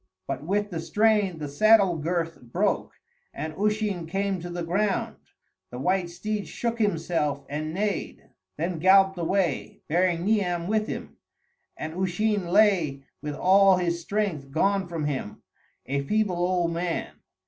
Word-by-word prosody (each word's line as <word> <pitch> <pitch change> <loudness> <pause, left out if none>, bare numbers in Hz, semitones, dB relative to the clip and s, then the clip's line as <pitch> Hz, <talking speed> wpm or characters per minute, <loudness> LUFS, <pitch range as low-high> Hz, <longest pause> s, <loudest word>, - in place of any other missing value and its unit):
But 135 +1 -3
with 205 +4 -1
the 165 - -3
strain 210 0 +2
the 150 -2 -5
saddle 200 +4 +5
girth 165 +1 -2
broke, 180 - -1 0.4
and 155 0 -4
Usheen 210 -3 -1
came 195 +2 -1
to 175 +1 -7
the 175 0 -4
ground; 195 +4 -1 0.5
the 125 - -8
white 180 +6 0
steed 205 +4 -4
shook 235 -1 -3
himself 165 -8 0
and 155 +2 -3
neighed, 200 +2 -3 0.3
then 170 +1 -2
galloped 190 +1 +5
away, 175 -2 -1
bearing 175 +1 +1
Niam 180 -5 +1
with 215 +2 0
him, - - -6 0.6
and 155 0 -5
Usheen 190 +2 0
lay 175 -8 +3 0.2
with 150 0 -4
all 195 +2 +5
his 170 -1 -1
strength 175 -7 -2
gone 195 +6 +1
from 165 -3 -3
him 135 -8 -4 0.4
a 140 +1 -1
feeble 200 +4 0
old 175 -1 +1
man. 170 0 -3
180 Hz, 145 wpm, -26 LUFS, 165-200 Hz, 0.6 s, saddle